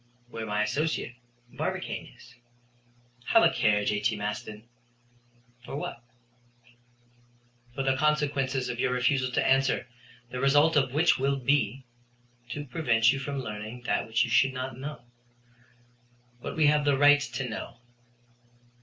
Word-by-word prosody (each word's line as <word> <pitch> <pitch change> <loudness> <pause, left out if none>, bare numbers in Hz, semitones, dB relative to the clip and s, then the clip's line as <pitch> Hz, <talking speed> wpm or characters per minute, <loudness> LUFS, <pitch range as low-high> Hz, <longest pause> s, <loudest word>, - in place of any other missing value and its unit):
"Where 115 -2 -6
my 105 0 0
associate, 145 +2 -2 0.4
Barbicane, - - -4
is." 120 - -17 0.9
"Have 225 - +5
a - - +5
care, 105 -1 +2
J.T. 105 +2 0
Maston." 105 +1 -5 1.0
"For 135 - -7
what?" 125 -4 -6 1.7
"For 135 - -2
the 135 0 +2
consequences 140 -3 0
of 120 -1 -5
your 125 - +1
refusal 130 +1 +1
to - - +1
answer, 135 0 +2 0.5
the 125 - -4
result 145 +4 +4
of 135 -3 +2
which 160 -1 +3
will 140 +1 +1
be 135 -2 0 0.3
" 120 0 -35
"To 145 +2 -5
prevent 120 -5 +2
you 135 - -3
from 140 0 -4
learning 110 +2 -7
that - - -1
which 110 +1 +2
you - - -3
should 135 -1 +4
not 130 -1 -5
know." 135 -1 -7 1.4
"What - - -6
we 155 - +3
have 150 0 +4
the 145 -2 +2
right 145 +1 +6
to 135 -2 -4
know." 110 - -7
130 Hz, 145 wpm, -28 LUFS, 120-145 Hz, 1.7 s, right